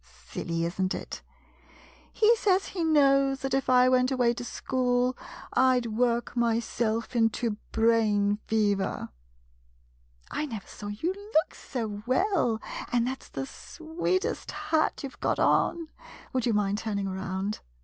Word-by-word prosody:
— - - -22
silly, 165 0 -2
is 170 +3 -3
n't 185 0 +1
it? - - -7 0.9
He 450 +2 +4
says 390 -3 +1
he 355 -3 -3
knows 275 -3 +4
that 270 -1 -2
if 270 -1 0
I 250 0 +6
went 255 0 +3
away 245 -2 +3
to 245 - -6
school 250 0 0 0.2
— - - -14
I 255 -1 +4
'd 230 -3 -5
work 240 0 +1
myself 230 0 0
into 225 -1 +1
brain 215 -3 +2
fever! 205 -3 0 1.2
I 305 - -2
never 220 -7 -6
saw 205 - -9
you 215 - -2
look 400 -4 0
so 220 -5 -5
well, 260 - +2 0.3
and 240 -1 +2
that 260 +1 -3
's - - -16
the 135 - -4
sweetest 345 - -3
hat 315 -2 0
you 275 - -3
've - - -20
got - - 0
on. 330 -2 +2 0.4
Would 255 -2 0
you 235 - +2
mind 205 0 +1
turning 205 -3 -2
around 190 +2 -3
240 Hz, 155 wpm, -28 LUFS, 215-275 Hz, 1.2 s, I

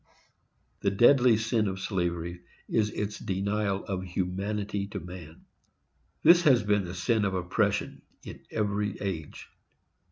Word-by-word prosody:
The 100 - +1
deadly 120 +3 +5
sin 110 -1 0
of 95 0 -3
slavery 85 -2 -2 0.3
is 105 -2 +1
its 105 0 -4
denial 100 +1 -1
of 95 -2 -3
humanity 100 +3 -3
to 100 0 -6
man. 90 -3 -11 0.8
This 170 0 +7
has 130 -8 +4
been 105 -2 +1
the 90 +1 -6
sin 110 +5 +1
of 95 -2 0
oppression, 90 -1 -1 0.2
in - - -9
every 105 -1 -1
age. 90 -7 -5
100 Hz, 130 wpm, -28 LUFS, 90-105 Hz, 0.8 s, This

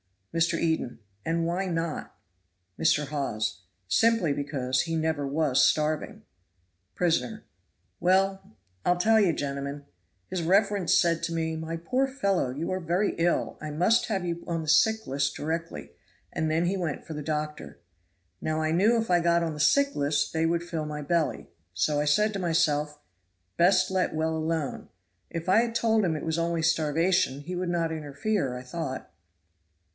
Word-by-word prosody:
Mr. 165 0 +2
Eden. 160 -7 -1 0.3
"And 165 +1 0
why 180 +3 -1
not?" 165 -2 -3 0.6
Mr. 150 -3 +2
Hawes. 110 -10 -2 0.3
"Simply 225 -8 +3
because 135 -3 -1
he 165 -1 -3
never 160 -3 -1
was 145 -2 +2
starving." 155 0 0 0.7
Prisoner. 180 +5 0 0.6
"Well! 190 - +1 0.3
I'll 180 - +2
tell 220 +5 +4
you, 195 -5 +4
gentlemen. 140 0 -4 0.4
His 185 -2 -2
reverence 195 +1 +2
said 170 -2 +3
to 170 0 -2
me, 160 -1 -1
'My 160 +1 -4
poor 255 +11 0
fellow, 200 - 0
you 145 +8 -4
are 185 - -1
very 180 +4 0
ill 170 +1 +1
I 155 - -5
must 180 +10 +2
have 195 -5 -1
you 170 0 -3
on 165 -1 -2
the 155 - -4
sick 220 +7 +4
list 140 +1 -1
directly,' 165 +2 -4 0.4
and 160 0 -1
then 160 +2 +1
he 190 +3 0
went 170 -6 -3
for 160 - -7
the 150 - -5
doctor. 150 0 -4 0.6
Now 155 0 -1
I 155 0 0
knew 205 +8 +4
if 225 -4 -2
I 175 - +5
got 170 0 +2
on 165 -1 -2
the 150 - -8
sick 280 - +3
list 145 0 0
they 160 0 +1
would 170 +1 0
fill 165 -3 -4
my 150 0 -5
belly; 145 - -1 0.2
so 145 - +1
I 150 - +1
said 210 +9 +3
to 200 - -3
myself, 155 -4 +1 0.6
best 185 +2 +4
let 185 -3 0
well 160 +1 0
alone. 160 -3 -2 0.4
If 165 +1 -5
I 190 - +6
had 230 0 -1
told 225 -2 +2
him 165 -3 0
it 150 - -5
was 160 0 -1
only 165 -1 0
starvation 165 -1 +2
he 180 +5 -6
would 180 0 -2
not 170 -2 0
interfere, 150 -1 -2
I 125 - -8
thought." 130 - -5
165 Hz, 170 wpm, -27 LUFS, 150-180 Hz, 0.7 s, I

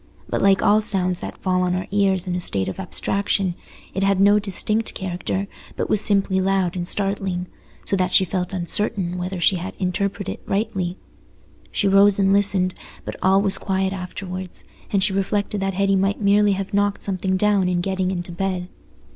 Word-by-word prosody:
But - - -2
like 195 -1 +4
all 210 +1 +5
sounds 185 -4 -1
that - - -7
fall 185 -1 0
on 180 0 +1
our 185 - -2
ears 195 -2 +2
in 180 -1 -2
a - - -1
state 95 - 0
of - - -5
abstraction, 195 0 0 0.4
it 190 - -2
had 195 -1 +2
no 205 +1 +5
distinct 210 +2 -1
character, 185 +1 -3 0.3
but - - -3
was 210 - +4
simply 195 -2 +2
loud 190 -2 +1
and 175 -1 -3
startling, 195 -3 -1 0.4
so - - +1
that 185 -1 0
she 190 - +5
felt 180 0 -2
uncertain 180 0 0
whether 180 +1 -4
she 180 +2 +4
had 185 +3 -6
interpreted 200 +2 -2
it - - -28
rightly. 195 -3 -1 0.7
She 200 - +1
rose 195 +1 +5
and 195 -1 +3
listened, 195 -2 +2 0.3
but - - -5
all 195 +1 +4
was 195 -2 +1
quiet 190 -1 -1
afterwards, 185 -1 -6 0.3
and 195 -2 +3
she 200 -1 +2
reflected 200 +1 -1
that 195 -1 -1
Hetty 195 0 +2
might 195 +1 +1
merely 205 0 +4
have 195 0 -4
knocked 205 0 +1
something 190 -1 -1
down 200 -2 +2
in 180 -1 0
getting 190 0 -1
into 175 -1 -4
bed. 180 0 -3
195 Hz, 190 wpm, -22 LUFS, 185-200 Hz, 0.7 s, all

